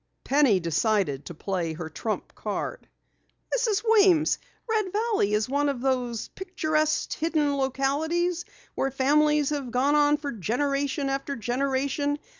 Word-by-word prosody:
Penny 275 -8 +4
decided 170 - 0
to 175 - -8
play 175 -2 -2
her 160 0 -6
trump 215 +7 -4
card. - - -5 0.7
"Mrs. 455 -4 +1
Weems, 390 -8 +4 0.3
Red 430 -4 0
Valley 425 - +1
is 215 +1 0
one 285 +2 +1
of 275 -3 -2
those 250 -3 -1
picturesque 310 -5 -1
hidden 305 -3 0
localities 310 +6 0 0.3
where 270 - 0
families 295 +2 +2
have 280 -4 -3
gone 255 +5 +2
on 295 0 +4
for 290 -1 -4
generation 275 - -1
after 275 +1 -2
generation. 275 +4 -1
280 Hz, 130 wpm, -26 LUFS, 245-310 Hz, 0.7 s, Penny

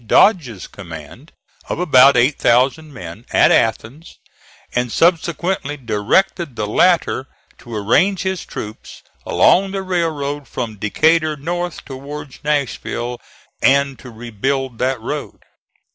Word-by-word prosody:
Dodge's 125 - +3
command, 85 - -11 0.4
of - - -2
about 140 -6 +6
eight 130 +5 +3
thousand 135 +6 +2
men, 105 -4 -9
at - - +4
Athens, 115 +8 0 0.6
and 125 -1 -1
subsequently 170 -2 +1
directed 130 - 0
the 105 - -2
latter 150 - +2 0.3
to 120 -2 -9
arrange 175 - +2
his 190 -2 -2
troops 105 0 -9 0.2
along 195 +2 +4
the 195 0 -4
railroad 150 -6 -2
from 115 -4 -5
Decatur 155 +9 +2
north 175 +4 -4
towards 140 +1 -8
Nashville, 125 -4 -2 0.4
and 140 0 +3
to 125 - -11
rebuild 120 +2 -3
that 130 0 0
road. 145 +6 -5
140 Hz, 115 wpm, -19 LUFS, 120-165 Hz, 0.6 s, about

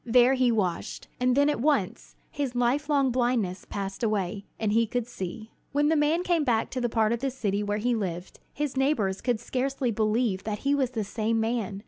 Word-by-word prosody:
There 245 +2 +5
he 255 -2 +3
washed, 185 -7 -2
and 250 +1 +2
then 285 0 +5
at 295 - 0
once 280 -10 0 0.2
his 275 -4 -3
life 250 +5 +1
long 275 -3 +3
blindness 240 -7 0
passed 195 -1 -4
away, 205 -3 -1
and 215 -2 0
he 230 +1 +3
could 245 +1 -2
see. 220 -1 -7 0.2
When 290 +1 +3
the 320 - +3
man 310 +4 +2
came 345 -3 +2
back 230 -5 +1
to 255 - -3
the 240 - 0
part 220 0 +2
of 235 - -2
the 270 +2 -1
city 210 -6 -1
where 205 0 -1
he 240 +3 +1
lived, 180 -5 -4
his 295 -2 -3
neighbors 265 -9 +1
could 240 -2 0
scarcely 260 +1 -1
believe 215 -2 0
that 210 -1 -3
he 280 - +3
was 270 -3 +1
the 225 -4 -3
same 225 +2 -1
man. 220 -3 -1
235 Hz, 210 wpm, -27 LUFS, 210-265 Hz, 0.2 s, There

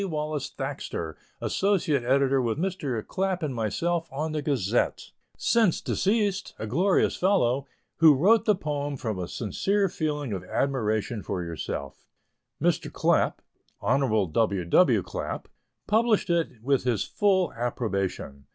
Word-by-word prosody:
Wallace 150 -5 -3
Thaxter, 80 -2 -5 0.3
associate 175 -9 +1
editor 135 +1 +3
with 115 -1 -1
Mr. 155 - -2
Clapp 190 -2 -1
and 145 -4 -1
myself, 165 +10 -1
on 155 +4 -3
the 155 -1 -2
Gazette 120 -7 0 0.3
since 225 -7 +3
deceased, 200 -1 0
a - - -4
glorious 180 - +2
fellow 140 -9 +2 0.3
who 155 -2 +7
wrote 205 +11 +4
the 210 - +4
poem 145 -4 -3
from 110 -6 -3
a 90 - -3
sincere 195 - 0
feeling 150 - -2
of 95 -2 -4
admiration 110 -2 -1
for 90 -2 -3
yourself. 80 -4 -6 0.5
Mr. - - 0
Clapp, - - +1 0.4
(Hon. 110 - +1
W. 100 -3 +1
W. 85 - +4
Clapp,) - - -5 0.4
published 220 -3 +2
it 160 -10 -1
with 135 +1 +2
his 120 -6 +1
full 190 -3 +1
approbation. 100 - -3
140 Hz, 135 wpm, -26 LUFS, 110-180 Hz, 0.5 s, who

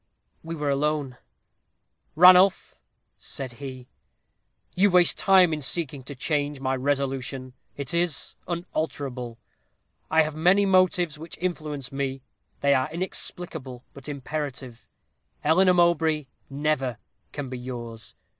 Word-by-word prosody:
We 165 +1 -5
were 150 -2 -1
alone. 145 -2 -1 1.0
"'Ranulph,' 180 +3 +6 0.4
said 135 -3 -5
he, 130 -2 -7 0.9
'you 200 +3 +4
waste 180 -2 +4
time 185 -4 +5
in 150 - -3
seeking 145 -1 0
to 145 - -8
change 145 +1 -1
my 130 0 0
resolution. 135 -1 -2 0.2
It 140 0 -4
is 170 -3 -1
unalterable. 140 -8 -4 0.7
I 160 0 +5
have 155 0 -4
many 180 +6 +4
motives 180 -5 +2
which 165 +2 -8
influence 150 -7 -3
me; 135 -1 -3 0.4
they 140 0 +4
are 130 +1 +1
inexplicable, 160 -6 -5
but 140 +1 -9
imperative. 135 -4 -5 0.6
Eleanor 180 +4 +4
Mowbray 165 -3 +3 0.2
never 140 -4 -1 0.3
can 145 -2 -5
be 130 -1 -5
yours. 120 -3 -8
145 Hz, 115 wpm, -25 LUFS, 135-170 Hz, 1.0 s, Ranulph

